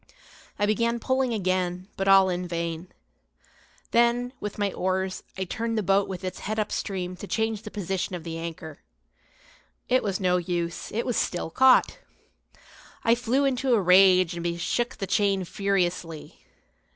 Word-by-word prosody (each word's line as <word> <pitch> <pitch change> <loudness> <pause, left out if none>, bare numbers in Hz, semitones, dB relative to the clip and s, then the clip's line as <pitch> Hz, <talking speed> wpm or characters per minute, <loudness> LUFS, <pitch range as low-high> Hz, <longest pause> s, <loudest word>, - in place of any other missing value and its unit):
I 205 - +1
began 230 +3 +1
pulling 260 0 0
again, 185 -3 -1
but 195 - -2
all 195 -1 +7
in 180 0 -2
vain. 170 0 -4 1.0
Then, 240 +1 +2
with 210 - -5
my 205 -2 -1
oars, 185 0 -1 0.2
I 190 - -1
turned 225 +5 -3
the 215 - 0
boat 195 +1 +2
with 190 -1 -6
its 185 - -5
head 215 +2 -4
up 215 -1 -1
stream 185 -3 -3
to 200 - -8
change 220 -1 -1
the 220 - -8
position 190 -2 -3
of 170 - -7
the 165 -1 -5
anchor. 160 -2 -7 1.1
It 255 +1 +3
was 195 -3 -2
no 180 -2 +2
use, 170 -1 -3
it 230 +2 -2
was 245 - -1
still 175 -2 -1
caught. 260 +4 +4 1.0
I 230 - +4
flew 245 +3 +1
into 260 -1 +2
a - - +3
rage 185 -1 +5
and 170 0 -3
shook 240 +7 -1
the 195 - -3
chain 195 -1 +1
furiously. 180 -5 -2
195 Hz, 165 wpm, -26 LUFS, 180-225 Hz, 1.1 s, all